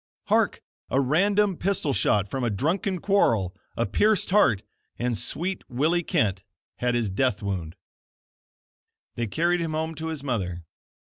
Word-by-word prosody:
Hark! - - +2 0.3
a 135 - +2
random 195 +7 +2
pistol 180 -7 0
shot 105 -5 +2
from 130 +5 -3
a 120 - +1
drunken 170 - 0
quarrel, 115 - +2 0.2
a - - +2
pierced 205 - +2
heart, 140 - +4 0.3
and 120 -1 0
sweet 175 - -3
Willie 155 +8 +1
Kent 100 - 0 0.3
had 125 -1 0
his 115 -5 0
death 110 0 0
wound 90 -4 -3 1.4
They 120 -1 -2
carried 170 - +1
him 165 -2 -2
home 160 +1 -2
to 160 +1 -5
his 160 -4 -4
mother. 95 -10 -2
135 Hz, 145 wpm, -26 LUFS, 105-175 Hz, 1.4 s, heart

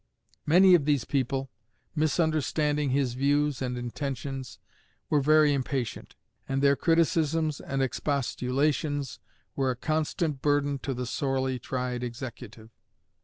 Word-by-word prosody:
Many 185 +4 +7
of 165 -5 +5
these 145 -5 +1
people, 135 -1 -1 0.4
misunderstanding 155 -2 +1
his 130 -2 +1
views 145 +1 +1
and 125 -1 -2
intentions, 130 +1 -5 0.5
were 150 - +4
very 155 +1 +5
impatient; 130 -3 -3 0.3
and 135 +1 0
their 140 0 +5
criticisms 160 -1 +1
and 135 0 -1
expostulations 140 +1 -1 0.4
were 135 -1 +1
a 125 - -1
constant 155 +1 -1
burden 145 -1 +1
to 135 0 -3
the 125 +1 -3
sorely 130 0 -1
tried 125 0 -3
Executive. 120 -2 -8
140 Hz, 120 wpm, -28 LUFS, 130-150 Hz, 0.5 s, Many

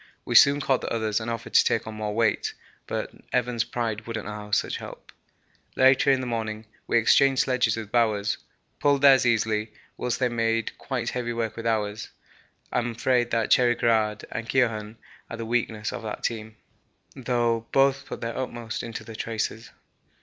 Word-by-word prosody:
We - - -3
soon 140 +1 +7
caught 135 -2 +1
the - - -4
others 110 -2 0
and 110 +1 -5
offered 115 0 -5
to - - +7
take 115 - 0
on 110 - -6
more 105 -1 -4
weight, 115 -2 +1 0.3
but - - -3 0.2
Evans' 125 -2 +1
pride 115 -3 -3
wouldn't 115 -2 -4
allow 105 0 -7
such 105 - 0
help. - - -10 0.6
Later 130 +1 +5
in 135 -1 +3
the - - -4
morning 110 -2 -3 0.2
we - - +3
exchanged 135 +3 +4
sledges 125 -4 +1
with 110 -2 -6
Bowers, 105 -4 +1 0.4
pulled 140 -1 +2
theirs 135 -3 +7
easily, 110 -1 +1 0.3
whilst 125 -1 -1
they 130 - +2
made 115 -1 -1
quite 125 -4 -3
heavy 120 -1 -3
work 115 -1 -2
with 115 0 -4
ours. 105 -1 -1 0.6
I - - +1
am 120 0 -2
afraid 120 +1 +1 0.2
Cherry 120 -1 +5
Garrard 110 -3 +1
and 115 0 -5
Keohane 110 -4 0 0.3
are 115 - -6
the 115 - -5
weakness 110 -2 -1
of - - -5
that 110 -1 -6
team, 110 -2 -3 0.6
though 120 -2 0
both 135 0 +3
put - - -7
their 115 0 -3
utmost 120 -3 -4
into 115 -1 -6
the 110 0 -10
traces. 110 0 -3
115 Hz, 180 wpm, -26 LUFS, 110-125 Hz, 0.6 s, soon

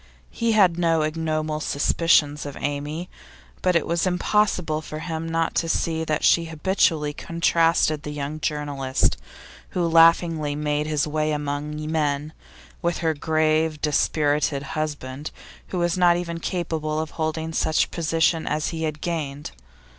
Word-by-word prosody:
He 230 -1 0
had 185 -5 +4
no 165 -2 +2
ignoble 155 -1 -1
suspicions 150 0 +2
of 140 - -7
Amy, 145 +4 -3 0.5
but 185 -1 +2
it 170 - +2
was 170 +2 0
impossible 180 -4 +1
for 155 -1 -7
him 160 0 -4
not 165 0 0
to 165 - 0
see 160 0 0
that 155 -1 -1
she 170 - +4
habitually 160 -2 +1
contrasted 165 -2 +1
the 150 - -6
young 150 +1 -4
journalist, 145 - 0 0.6
who 175 -1 +2
laughingly 165 -2 +4
made 150 0 -1
his 150 -2 +1
way 155 0 -1
among 150 0 -3
men, 150 -1 -1 0.5
with 170 0 0
her 160 - +3
grave, 155 0 +1
dispirited 150 -1 +1
husband, 145 -2 -4 0.4
who 185 - -4
was 175 +1 0
not 175 -1 +5
even 170 -1 -4
capable 160 -3 -2
of 160 -1 -4
holding 160 0 -3
such 155 0 +1
position 165 0 +1
as 150 0 -1
he 160 -1 -3
had 155 -1 -4
gained. 150 -4 -4
155 Hz, 145 wpm, -24 LUFS, 150-165 Hz, 0.6 s, not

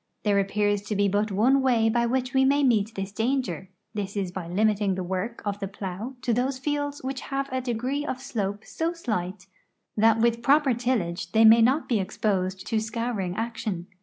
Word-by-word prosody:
There 205 -2 +3
appears 205 +1 +1
to 215 - -2
be 200 0 +3
but 205 +2 0
one 250 +8 +3
way 240 -4 +3
by 235 +1 +2
which 255 +1 -1
we 265 0 +4
ma}^ 280 +1 +3
meet 220 -3 +2
this 195 0 -4
danger 220 - -2
— - - -51
this 205 -1 -4
is 190 -3 -2
by 180 -2 -6
limiting 205 +1 +1
the 185 - -3
work 190 +6 -4
of 205 0 -2
the 195 - -3
plow 200 +5 -6
to 240 - +1
those 255 +3 0
fields 290 +1 -3
which 265 -1 -4
have 275 0 -3
a 260 0 -1
degree 255 +4 -2
of 260 -4 -4
slope 210 -5 -3
so 330 +1 -2
slight 190 - -4 0.5
that 220 +1 +4
with 235 0 +2
i)i'oi)er 275 0 +4
tillage 225 -8 -2
they 225 0 +6
may 225 +1 +8
not 260 +7 +3
be 230 -4 +1
exposed 190 -1 -1
to 225 - 0
scouring 215 -4 -3
action. 220 -5 -3
220 Hz, 200 wpm, -26 LUFS, 200-255 Hz, 0.5 s, may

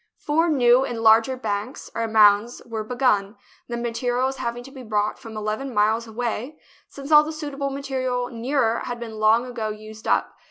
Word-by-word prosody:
Four 325 +3 +1
new 250 -3 +4
and 240 -4 -4
larger 225 +4 +5
banks, 215 +1 -4
or 230 0 -2
mounds, 215 +1 +4
were 225 -2 -4
be 245 +3 -6
gun, 210 -5 +1 0.3
the 235 - -4
materials 245 +3 -1
having 235 0 -4
to 270 - -12
be 265 -1 -10
brought 215 -2 -1
from 220 -1 -9
eleven 215 +6 -3
miles 220 +2 +2
away, 240 +5 -4 0.3
since 280 +2 -9
all 300 +1 +6
suitable 290 -3 -4
material 260 -3 -2
nearer 235 -1 0
had 245 -1 -5
been 225 -2 -7
long 220 +3 +4
ago 235 -3 -4
used 215 +1 -9
up. - - +1
240 Hz, 175 wpm, -23 LUFS, 220-265 Hz, 0.3 s, all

